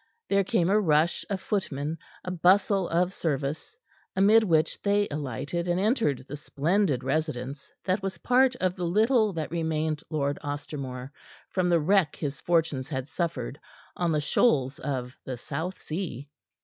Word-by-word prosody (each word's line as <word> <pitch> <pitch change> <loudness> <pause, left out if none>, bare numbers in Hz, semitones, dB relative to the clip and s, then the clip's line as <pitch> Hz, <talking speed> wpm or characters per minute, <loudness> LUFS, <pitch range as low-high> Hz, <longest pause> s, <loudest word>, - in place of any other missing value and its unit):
There 200 0 +3
came 180 -1 +1
a 210 - +5
rush 160 -3 +2
of 200 -2 -1
footmen, 160 -7 -2 0.2
a 180 - -4
bustle 185 +2 +3
of 175 +2 +1
service, 150 - -3 0.4
amid 205 +4 +6
which 165 -5 +1
they 205 0 +2
alighted 145 +4 -3
and 175 +1 +1
entered 200 - +1
the 145 - -5
splendid 150 -1 0
residence 140 -1 -2
that 190 +1 0
was 190 -2 -3
part 250 +6 +3
of 185 -5 0
the 180 - -4
little 215 +4 +3
that 160 -2 -4
remained 160 -2 -1
Lord 145 -2 -1
Ostermore 140 -3 -5 0.4
from 185 -2 +1
the 170 -1 +4
wreck 175 -1 +3
his 145 -3 -4
fortunes 160 -6 +1
had 135 -3 -4
suffered 145 -6 -3 0.4
on 175 -2 0
the 150 -1 +1
shoals 140 - +2
of 130 -3 -3
the 130 -2 -5
South 160 +9 -4
Sea. 155 -5 -5
165 Hz, 155 wpm, -27 LUFS, 145-190 Hz, 0.4 s, amid